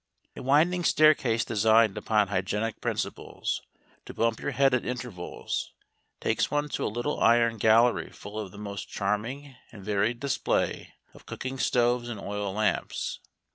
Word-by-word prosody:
A - - -7
winding 160 +7 +3
staircase 140 -9 +4
designed 110 -1 +4
upon 105 -3 +1
hygienic 105 +3 -2
principles, - - -3 0.5
to - - -9
bump 115 -1 +1
your - - -3
head 135 -2 +3
at 125 - +2
intervals, 120 -8 -5 0.5
takes - - 0
one 145 0 -1
to - - -3
a - - 0
little 120 +7 -2
iron 115 -1 +4
gallery 115 +3 +4
full 105 +1 -8
of 105 -3 -5
the 100 - -13
most 100 -1 -6
charming 115 +8 -3 0.2
and 100 -4 -12
varied 105 +3 0
display 140 0 -1 0.2
of - - -17
cooking 130 +1 -5
stoves 120 -1 +2
and 115 -4 -5
oil 100 0 -3
lamps. 105 +2 -1
115 Hz, 150 wpm, -27 LUFS, 105-125 Hz, 0.5 s, staircase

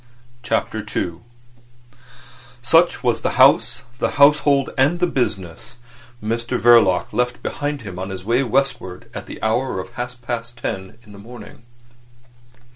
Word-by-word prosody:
CHAPTER - - -1 0.2
II 85 -1 -2 1.4
Such 165 +7 +3
was 120 -2 +1
the - - -1
house, 125 - +4 0.2
the - - +1
household, 140 -1 +4
and 145 +6 +2
the 180 - +3
business 120 - -3 0.5
Mr 115 +2 -2
Verloc 115 -6 +4
left 125 0 -1
behind 145 -1 -3
him 95 -5 -8
on 95 +1 -4
his 95 -1 -7
way 120 +4 +2
westward 120 -8 -2
at - - -7
the - - -9
hour 110 0 0
of 95 0 -6
half 125 0 -6
past 120 0 -5
ten 95 -2 -5
in 105 - -17
the 100 - -12
morning. 115 +1 -12
120 Hz, 140 wpm, -20 LUFS, 100-135 Hz, 1.4 s, house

